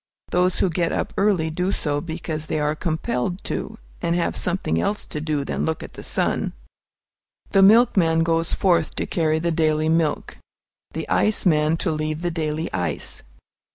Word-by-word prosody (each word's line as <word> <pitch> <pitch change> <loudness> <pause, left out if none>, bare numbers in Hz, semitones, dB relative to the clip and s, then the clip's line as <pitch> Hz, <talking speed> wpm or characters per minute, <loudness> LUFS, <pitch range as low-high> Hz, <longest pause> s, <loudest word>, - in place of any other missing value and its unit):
Those 180 0 +2
who 185 - +2
get 170 +1 0
up - - -2
early 190 -6 +2
do 180 +4 -1
it 145 -5 -1
because 160 -2 -4
they 160 - -1
are 150 0 +1
compelled 160 0 -2
to, - - -4 0.2
and 170 - 0
have 175 - 0
something 170 - 0
else 205 - -1
to 150 - -5
do 150 -2 -1
than - - -2
look 160 0 -2
at - - -10
the - - -9
sun. - - 0 1.0
The 195 - +5
milkman 190 -6 +5
goes 165 0 +1
forth 170 -4 +1
to - - -2
carry 155 -2 +1
the 170 +1 0
daily 155 -1 +1
milk, 160 -2 0 0.6
the - - -4
ice 215 -1 +1
man 155 -1 +3
to 170 - +2
leave 155 +1 -3
the 175 - 0
daily 160 -1 -3
ice. 85 -5 -3
160 Hz, 175 wpm, -23 LUFS, 155-175 Hz, 1.0 s, The